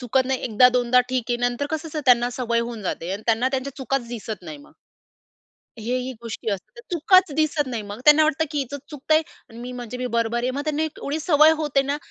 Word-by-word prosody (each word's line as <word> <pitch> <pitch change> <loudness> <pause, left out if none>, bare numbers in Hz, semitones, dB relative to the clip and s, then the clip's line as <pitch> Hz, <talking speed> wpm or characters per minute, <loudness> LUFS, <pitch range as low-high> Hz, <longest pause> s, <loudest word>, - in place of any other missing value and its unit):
चुकत 255 +1 +1
नाही, 265 -1 -1
1दा-2दा 250 +1 +4
ठीक 255 -2 -1
आहे. 240 - +2
नंतर 245 +4 -3
कसं 315 +1 -3
असतं, 305 0 -4
त्यांना 245 0 +5
सवय 235 -2 -1
होऊन 235 -2 -5
जाते 180 -1 -4
आणि 205 +2 -5
त्यांना 230 +3 +2
त्यांच्या 265 0 -3
चुकाच 265 -2 -2
दिसत 220 -2 -6
नाही 300 - -8
मग. 290 - -17 1.1
हे 240 +3 -2
ही 255 +1 -3
गोष्टी 225 -1 -6
असतात. 200 - -6
चुकच 355 0 +4
दिसत 310 -2 +1
नाही 235 -4 -4
मग. 205 +2 -8
त्यांना 305 +1 +7
वाटतं, 315 +1 +1
की 295 - -2
हीचच 275 +1 -4
चुकतं 295 +1 0
आहे 315 - +4 0.3
आणि 230 - -12
मी 250 +1 -7
म्हणजे 245 0 -7
मी 250 - -2
बरोबर 230 +1 0
आहे. 255 - 0
मग 280 +3 -3
त्यांना 305 0 -1
एवढी 310 -1 -3
सवय 305 -1 +5
होते 285 -3 +1
ना, 280 +2 -2
255 Hz, 225 wpm, -23 LUFS, 235-295 Hz, 1.1 s, त्यांना